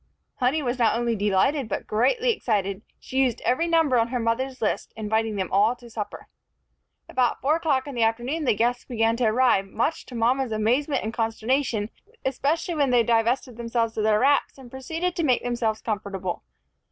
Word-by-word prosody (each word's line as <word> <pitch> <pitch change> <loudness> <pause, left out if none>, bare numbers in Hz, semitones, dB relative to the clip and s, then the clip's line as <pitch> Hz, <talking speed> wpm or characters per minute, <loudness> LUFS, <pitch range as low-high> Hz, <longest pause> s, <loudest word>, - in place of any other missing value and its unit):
Honey 270 +4 +1
was 250 0 -2
not 230 -1 +3
only 235 -1 0
delighted, 210 +6 +1
but - - -3
greatly 475 - +2
excited. 200 - -1 0.2
She 265 - -3
used 255 -4 +2
every 295 +7 +1
number 325 -7 +3
on 230 - +2
her 250 +1 -2
mother's 255 +3 -1
list, 215 - -2
inviting 220 0 -1
them 190 -2 -3
all 210 +5 +3
to 240 -1 -15
supper. 215 -2 -6 0.8
About 250 -2 0
four 300 +4 +2
o'clock 285 -6 0
in 285 - -7
the 240 - -2
afternoon 240 +8 0
the 245 - +3
guests 240 +3 0
began 225 -1 0
to 245 - +1
arrive, 220 -4 +3
much 240 +11 -2
to 250 - -9
mama's 245 +2 +1
amazement 250 +6 +1
and 220 +1 -4
consternation, 225 0 -1 0.3
especially 290 +6 0
when 290 -4 +1
they 245 -2 +4
divested 235 +2 +1
themselves 230 -1 -1
of 215 - -1
their 215 0 +3
wraps, 280 +2 +2
and 255 -3 -13
proceeded 325 +7 -3
to 335 - 0
make 255 -5 +2
themselves 235 -3 -1
comfortable. 200 -4 -3
240 Hz, 185 wpm, -25 LUFS, 220-265 Hz, 0.8 s, they